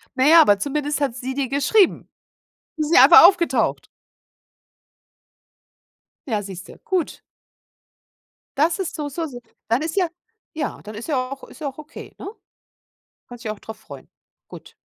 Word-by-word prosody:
Na 260 +2 +2
ja, 330 +1 +8
aber 205 -8 +4
zumindest 295 +2 -2
hat 265 -4 -1
sie 260 +1 -5
dir 270 -2 -3
geschrieben. 325 +8 +2 0.7
Ist 305 0 -2
nicht 255 - +8
einfach 335 +5 +9
aufgetaucht. 350 -3 +1 2.4
Ja, 215 -4 -1
siehst 190 -1 -9
du, - - -13
gut. 365 -4 -3 1.4
Das 320 +5 +1
ist 375 - -4
so 295 -2 -4
so 330 +4 -4
so 245 -5 -9 0.3
dann 230 +5 +1
ist 320 +3 -4
ja 370 -3 +2 0.5
ja, 300 -3 -4
dann 210 +1 -10
ist 230 - -8
ja 290 -4 0
auch 275 - -8
ist - - -17
ja 290 - -3
auch 270 - -16
okay, 305 +1 -11
ne? - - -8 1.0
Kannst 245 0 -12
dich 215 - -3
auch 215 - -6
drauf 220 +1 -10
freuen. 140 -10 -13 0.4
Gut. - - -13
280 Hz, 160 wpm, -21 LUFS, 235-320 Hz, 2.4 s, einfach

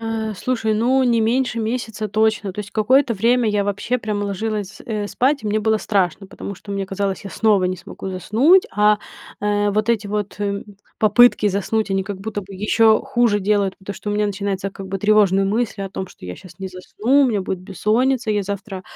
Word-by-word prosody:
Э, 225 -1 -3
слушай, 220 0 -1
ну, 255 +4 +2
не 235 -2 +3
меньше 235 +1 +1
месяца 220 -1 -3
точно. 215 -2 +1
То 210 - -5
есть 205 - -8
какое-то 250 +3 +3
время 235 +3 +2
я 205 -1 +1
вообще 205 +5 -1
прямо 210 -2 -2
ложилась, 205 0 -4
э, 210 -2 -2
спать, 275 +5 +1
и - - -5
мне 215 +1 +1
было 220 +1 +2
страшно, 195 -1 0
потому 200 0 -7
что 200 - -12
мне 195 -1 -2
казалось, 195 0 -3
я 195 - -7
снова 210 -4 +2
не 185 0 -1
смогу 190 - -8
заснуть, 235 - +4
а, 210 +1 +3 0.4
э, 205 0 +1
вот 215 +2 0
эти 215 -3 +1
вот 205 0 -3 0.6
попытки 215 0 +5
заснуть, 200 +2 -1
они 195 0 +1
как 200 -2 -6
будто 210 0 -4
бы 195 +1 -12
еще 220 +2 +3
хуже 230 -4 +1
делают. 200 -1 +1
Потому 195 +1 -7
что 205 - -5
у - - -1
меня 210 0 +1
начинается, 195 -1 -3
как 195 0 -9
бы, 195 0 -3
тревожные 200 -2 +3
мысли 210 0 -1
о 195 - -5
том, 190 -1 -5
что 90 - -15
я 90 - -6
сейчас 180 -1 -15
не 190 - -4
засну, 220 +9 +1
у - - +4
меня 210 -4 0
будет 185 0 -3
бессонница, 220 +6 0
я 205 -1 +1
завтра 195 -1 -5
210 Hz, 210 wpm, -20 LUFS, 195-225 Hz, 0.6 s, попытки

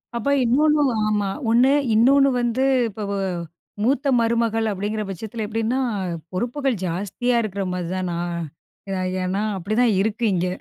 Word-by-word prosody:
அப்ப 235 +4 -1
இன்னொன்னும் 290 +2 +3 0.2
ஆமா. 205 -2 0 0.2
ஒண்ணு 245 +4 +5 0.2
இன்னொன்னு 275 +5 +5
வந்து 240 +2 0 0.3
இப்ப 210 +1 -7
வ - - -1 0.7
மூத்த 270 +3 +1
மருமகள் 230 -1 +1
அப்டிங்கிற 210 +2 -2
பட்சத்தில 215 +3 -5
எப்டின்னா! 225 +4 -1 0.5
பொறுப்புகள் 245 +6 -1
ஜாஸ்தியா 200 +8 -1
இருக்குற 200 -2 -3
மாதிரி 180 -2 -3
தான் 185 -1 -2
நான் 170 0 -3 0.5
ஏ, - - -3 0.3
ஏன்னா, 190 +3 -1 0.2
அப்டிதான் 215 +6 +1
இருக்கு 220 +3 -2
இங்க. 180 0 0
220 Hz, 135 wpm, -22 LUFS, 195-245 Hz, 0.7 s, ஒண்ணு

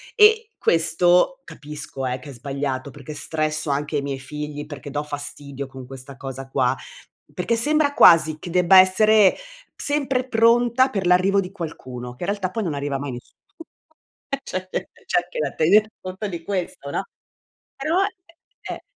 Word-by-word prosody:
E 440 0 +5
questo 175 +9 +3
capisco 150 - -7
eh, 125 0 -2
che 135 +3 -11
è - - -7
sbagliato 135 +1 -4
perché 145 +2 -9
stresso 155 0 -2
anche 145 +2 -1
i 140 - 0
miei 140 -1 -4
figli, 150 +2 -6
perché 145 -1 -9
do 145 +1 -3
fastidio 145 -1 -6
con 130 -1 -10
questa 135 +1 -10
cosa 135 -1 -7
qua, 130 -2 +1 0.6
perché 230 +6 -1
sembra 295 +3 +2
quasi 155 - +6
che 175 - -8
debba 180 +2 +6
essere 205 +2 +5 0.4
sempre 275 -3 0
pronta 240 +3 +4
per 195 -7 -3
l'arrivo 185 +3 +4
di 185 0 -7
qualcuno, 130 -9 -7
che 175 - -8
in 195 - -2
realtà 195 -3 -2
poi 225 - -2
non 165 -6 -2
arriva 140 -1 -2
mai 140 0 -5
in 125 - -5
nessuno, 120 - -14 0.9
e 275 -1 -3
c'è 185 0 -5 0.4
c'è - - +1
anche 175 - -7
da 145 -3 -1
tener 205 +7 +4
conto 185 +3 -5
di 170 -4 -6
questo, 180 -6 -4
no. - - -2 0.7
Però, 325 +7 +1
e 365 -4 -9
eh. - - -9
165 Hz, 170 wpm, -22 LUFS, 140-210 Hz, 0.9 s, quasi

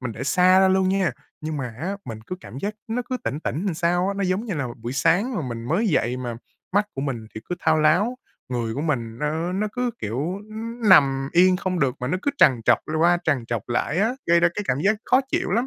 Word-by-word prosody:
mình 125 -3 -4
để 115 +4 -6
xa 180 +5 +5
ra 190 - +5
luôn 190 0 +3
nha, 190 -3 +2 0.3
nhưng 155 0 -4
mà 130 - -3
á, 190 +5 -2
mình 110 -2 -7
cứ 185 - -5
cảm 135 - -9
giác 205 +7 -3
nó 235 +3 -1
cứ 255 - -1
tỉnh 145 - -2
tỉnh 165 +3 -3
làm 185 - 0
sao 175 +2 +1
á. 200 - -1
Nó 200 - -1
giống 185 +4 0
như 210 -6 -3
là 145 -4 -2 0.2
buổi 120 +2 -4
sáng 175 - +2
mà 175 - -2
mình 115 -1 -5
mới 195 +9 +1
dậy 125 -7 +1
mà 120 -2 -5 0.4
mắt 205 +2 +2
của 135 - -4
mình 130 -6 -3
thì 110 - -6
cứ 180 - -1
thao 160 -2 +2
láo, 180 +11 +3 0.3
người 120 -3 -2
của 140 - -3
mình 120 -7 -2
nó 160 +4 -1
nó 210 +3 -1
cứ, 250 0 -1
kiểu, 110 +3 -4 0.3
ư, 215 - -11 0.3
nằm 135 -7 +5
yên 185 +1 +5
không 185 -1 -2
được, 130 -3 +2
mà 125 - -2
nó 185 - 0
cứ 285 - +1
trằn 125 -3 +5
trọc 120 -1 +5
l 155 - -2
qua 170 +2 +4
trằn 140 -6 +1
trọc 115 -2 -4
lại 140 +6 0
á, 220 +5 +2
gây 170 0 +4
ra 170 - +5
cái 205 - -2
cảm 125 - +1
giác 200 +6 +3
khó 255 - +4
chịu - - -1
lắm. 235 +7 +1
165 Hz, 265 wpm, -23 LUFS, 130-190 Hz, 0.4 s, xa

